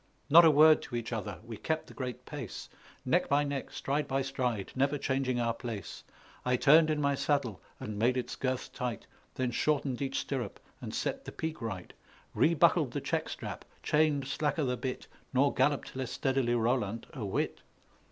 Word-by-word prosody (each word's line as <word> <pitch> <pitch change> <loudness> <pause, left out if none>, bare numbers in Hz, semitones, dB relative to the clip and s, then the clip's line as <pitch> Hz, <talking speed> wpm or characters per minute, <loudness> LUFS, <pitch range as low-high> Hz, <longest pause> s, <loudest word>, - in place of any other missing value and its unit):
Not 170 +3 +10
a - - +8
word 155 +1 +7
to 120 - -7
each 120 0 -3
other; 110 -4 -4
we 115 -2 -7
kept 160 +6 -2
the - - -13
great 125 -1 -5
pace 140 -8 -7 0.4
Neck - - +2
by 145 +1 +4
neck, 140 -2 -3
stride 145 +1 -2
by 135 0 0
stride, 125 -6 -2
never 140 +2 +2
changing 130 -2 0
our 115 -1 +1
place; 115 -6 -6 0.4
I 125 0 +2
turned 155 +5 +6
in 155 -1 +1
my 140 -1 +2
saddle 135 - 0 0.2
and 105 -1 -5
made 125 +3 +3
its 125 - -3
girths 130 -1 -2
tight, 125 -2 -4 0.3
Then 130 -1 -1
shortened 140 0 0
each 135 -1 -1
stirrup 130 -4 -3 0.2
and - - -5
set - - -2
the - - -6
pique 160 -2 -4
right, 95 -6 -5 0.4
Rebuckled - - +4
the - - -1
check - - -1
strap, - - -6 0.2
chained 150 -2 +2
slacker 150 +2 0
the 125 -2 0
bit, 130 0 -4 0.3
Nor 140 +2 +4
galloped 135 +1 +1
less 130 -2 -3
steadily 130 -3 +1
Roland 115 -2 0
a 130 - -5
whit. 100 - -1
130 Hz, 180 wpm, -31 LUFS, 120-145 Hz, 0.4 s, Not